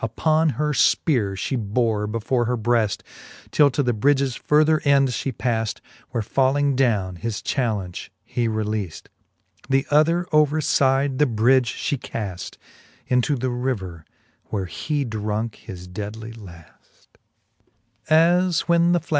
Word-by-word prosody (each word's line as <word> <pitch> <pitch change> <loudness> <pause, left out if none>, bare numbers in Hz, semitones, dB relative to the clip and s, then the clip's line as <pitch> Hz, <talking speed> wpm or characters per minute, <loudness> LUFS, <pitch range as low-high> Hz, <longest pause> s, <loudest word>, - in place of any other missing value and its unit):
Upon 155 +8 +1
her 150 +1 -1
fpeare 120 - +2
{he 130 - -2
bore 110 -1 0
before 115 +3 -1
her 125 +1 -1
breaft, 110 -4 +1 0.5
Till 145 -1 +5
to 140 +2 -1
the 120 -2 +1
bridges 135 +2 +1
further 155 +2 +2
end 140 -2 +4
fhe 130 +2 -2
pafl, 115 -4 -2 0.3
Where 115 -3 -2
falling 135 +4 +1
downe, 105 -9 +1
his 110 +3 -4
challenge 105 -9 -2
he 120 -1 -1
releafl: 110 -4 -3 0.6
The 135 0 +2
other 165 +4 +3
over 150 0 +3
fide 135 -2 +1
the 150 - +4
bridge 120 +2 +2
fhe 140 - -2
cafl 100 -8 -6 0.5
Into 125 +3 +2
the 130 0 -2
river, 105 -10 -3 0.4
where 100 -3 -3
he 145 - -3
drunke 110 0 -3
his 90 -3 -10
deadly 105 +4 -7
laft. 90 -7 -16
120 Hz, 125 wpm, -22 LUFS, 105-140 Hz, 0.6 s, Till